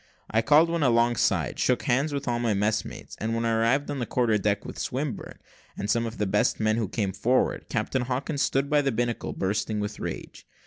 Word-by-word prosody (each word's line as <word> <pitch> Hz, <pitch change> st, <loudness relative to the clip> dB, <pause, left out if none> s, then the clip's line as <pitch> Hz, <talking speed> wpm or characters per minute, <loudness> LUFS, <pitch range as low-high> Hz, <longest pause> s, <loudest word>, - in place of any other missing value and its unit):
I 110 Hz, -, +3 dB
called 150 Hz, +7 st, +5 dB
one 170 Hz, -1 st, 0 dB
alongside, 120 Hz, -2 st, +2 dB
shook 125 Hz, -2 st, +2 dB
hands 135 Hz, +5 st, +1 dB
with 140 Hz, -1 st, -4 dB
all 120 Hz, -1 st, 0 dB
my 115 Hz, -3 st, +1 dB
messmates, 105 Hz, +2 st, -2 dB
and 110 Hz, +2 st, -1 dB
when 115 Hz, 0 st, -1 dB
I 115 Hz, -, +1 dB
arrived 120 Hz, +6 st, +1 dB
on 145 Hz, -, -3 dB
the 120 Hz, -, -2 dB
quarter 120 Hz, -3 st, +2 dB
deck, 100 Hz, 0 st, 0 dB
with -, -, -7 dB
Swinburne, 135 Hz, -3 st, -4 dB, 0.4 s
and 100 Hz, +1 st, -1 dB
some 115 Hz, +1 st, +1 dB
of 115 Hz, -, -7 dB
the 105 Hz, -, 0 dB
best 100 Hz, +1 st, +1 dB
men, 110 Hz, 0 st, +2 dB
who 115 Hz, -3 st, 0 dB
came 100 Hz, -4 st, -1 dB
forward, 125 Hz, +6 st, 0 dB
Captain 130 Hz, -, -1 dB
Hawkins 135 Hz, +4 st, -2 dB
stood 135 Hz, +1 st, +1 dB
by 150 Hz, 0 st, +3 dB
the 140 Hz, -1 st, 0 dB
binnacle, 120 Hz, 0 st, -2 dB
bursting 105 Hz, +2 st, -1 dB
with 105 Hz, 0 st, -4 dB
rage. -, -, -7 dB
120 Hz, 215 wpm, -26 LUFS, 110-135 Hz, 0.4 s, called